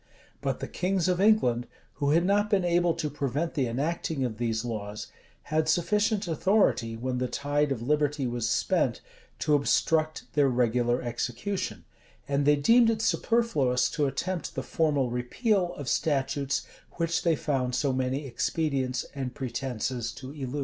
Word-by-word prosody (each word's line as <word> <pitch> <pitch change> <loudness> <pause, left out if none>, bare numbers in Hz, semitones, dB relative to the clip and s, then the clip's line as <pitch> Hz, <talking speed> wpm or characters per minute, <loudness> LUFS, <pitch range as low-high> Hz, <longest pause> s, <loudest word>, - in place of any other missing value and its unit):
But - - -2
the - - -3
kings 185 -1 0
of 180 0 +1
England, 125 - +3 0.3
who 140 - +2
had 165 +4 +3
not 205 +2 +2
been 195 -3 +2
able 175 -1 +2
to 155 - -2
prevent 145 +3 -2
the 135 -5 0
enacting 140 +2 -1
of 110 -3 -5
these 115 -1 -1
laws, 105 -3 -5 0.5
had 155 0 +2
sufficient 210 +4 +1
authority, 160 - +2
when 125 +1 -2
the 125 - 0
tide 145 +2 0
of 120 -4 -2
liberty 150 +1 +1
was 120 -2 -1
spent, - - +1 0.4
to 150 - +1
obstruct 155 +1 +2
their 145 -2 +4
regular 120 0 +1
execution; 120 - -3 0.4
and 140 0 +1
they 150 - +6
deemed 230 +11 +5
it 225 -1 0
superfluous 135 - +1
to 150 -3 +1
attempt 170 +5 -3
the - - -2
formal 145 -6 +1
repeal 175 - 0
of 145 - -7
statutes 140 -2 0 0.3
which 165 -1 0
they 165 -2 +2
found 130 -4 -1
so 140 -3 +1
many 130 +2 -1
expedients 130 0 -1
and 130 -3 -4
pretences 125 -1 -3
to 130 0 -9
elude. 140 -1 -4
140 Hz, 155 wpm, -28 LUFS, 125-165 Hz, 0.5 s, they